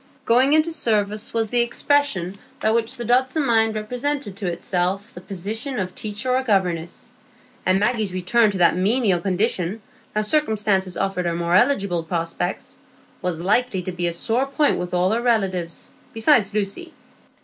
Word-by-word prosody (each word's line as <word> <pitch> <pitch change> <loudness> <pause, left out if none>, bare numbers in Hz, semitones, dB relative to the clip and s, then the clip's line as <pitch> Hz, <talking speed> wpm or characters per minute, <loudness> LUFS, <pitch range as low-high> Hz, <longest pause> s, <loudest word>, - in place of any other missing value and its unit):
"Going 255 +5 +4
into 315 +2 +3
service" 215 -7 0
was 225 -2 -1
the 245 - +3
expression 235 -6 0 0.2
by 220 - +1
which 225 0 0
the 240 - -5
Dodson 260 +5 +1
mind 225 -2 +2
represented 250 +1 -3
to 200 -3 -4
itself 185 +5 -2
the 180 - -10
position 215 +9 -4
of 185 -2 -3
teacher 215 +4 -4
or 255 +1 +2
governess; 180 -8 -1 0.6
and 185 +1 +3
Maggie's 215 -2 0
return 195 +5 +2
to 200 - -3
that 175 -2 +4
menial 200 0 +2
condition, 190 +1 +1 0.4
now 215 - +1
circumstances 210 -8 +1
offered 195 -2 -1
her 170 - -1
more 170 0 -1
eligible 195 -5 +2
prospects, 165 +2 -3 0.4
was 175 -2 -2
likely 210 0 +1
to 185 - -4
be 175 -1 -2
a 170 - -1
sore 235 +9 0
point 290 +2 +1
with 180 0 -4
all 180 +2 +2
her 230 +2 0
relatives, 190 -8 -1 0.2
besides 225 -3 +3
Lucy. 210 - -3
210 Hz, 160 wpm, -22 LUFS, 185-240 Hz, 0.6 s, Going